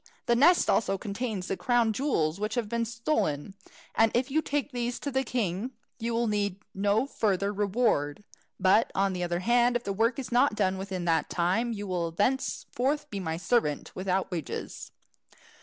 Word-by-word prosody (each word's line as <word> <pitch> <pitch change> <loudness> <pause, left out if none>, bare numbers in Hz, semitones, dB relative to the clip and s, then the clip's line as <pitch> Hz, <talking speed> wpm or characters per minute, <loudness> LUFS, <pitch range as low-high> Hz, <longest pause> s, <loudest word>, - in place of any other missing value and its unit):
The 235 - +3
nest 320 +8 +5
also 195 -3 +2
contains 205 -1 -4
the 195 - -2
crown 235 0 +2
jewels 195 - 0
which 215 +1 -2
have 240 -4 -1
been 235 +2 -1
stolen, 225 - -1 0.4
and 225 -1 +4
if 255 +3 +1
you 315 +3 +2
take 290 -1 -2
these 245 -1 -2
to 285 - -4
the 265 0 +1
king, 225 -1 -2 0.3
you 230 0 -2
will 235 +1 +1
need 205 -3 0 0.2
no 205 +5 +2
further 200 -6 0
reward. 205 -7 0 0.4
But, 190 +4 +4
on 195 0 +2
the 180 - -3
other 175 0 -1
hand, 240 +3 +3
if 240 - 0
the 200 - -2
work 230 +4 +1
is 260 -2 -5
not 245 -1 +3
done 190 -2 +1
within 190 -2 -4
the 165 -3 +3
time, 185 +8 +1
you 205 -2 -4
will 175 -3 -1
thenceforth 265 - -1
be 200 - -3
my 160 -3 -3
servant 180 -6 0
without 190 +1 -1
wages." 165 -4 -5
210 Hz, 180 wpm, -28 LUFS, 185-240 Hz, 0.4 s, nest